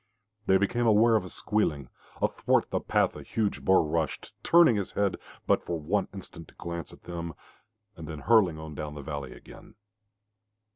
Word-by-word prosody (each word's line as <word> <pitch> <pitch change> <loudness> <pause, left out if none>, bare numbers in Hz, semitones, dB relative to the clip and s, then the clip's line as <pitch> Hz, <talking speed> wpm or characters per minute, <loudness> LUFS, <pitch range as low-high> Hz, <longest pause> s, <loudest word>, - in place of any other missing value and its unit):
They 95 - +6
became 115 +5 +1
aware 115 +1 +5
of 110 - +2
a 90 - -8
squealing. 75 -13 -1 0.4
Athwart - - +1
the - - +1
path - - +1
a - - -8
huge 110 -3 -2
boar 95 -2 +5
rushed, 80 0 -2
turning 170 -8 +6
his 100 -2 -3
head 100 -2 +1 0.3
but - - +2
for 85 -2 -3
one 90 +7 0
instant 95 -4 -10
to - - -20
glance 85 -2 -6
at - - -16
them, 85 -2 -6 0.6
and 80 -3 -9
then 80 -2 -7
hurling 105 -8 +4
on 80 0 -8
down 75 0 -6
the 70 - -7
valley 70 -3 -5
again. - - -15
85 Hz, 180 wpm, -28 LUFS, 80-105 Hz, 0.6 s, They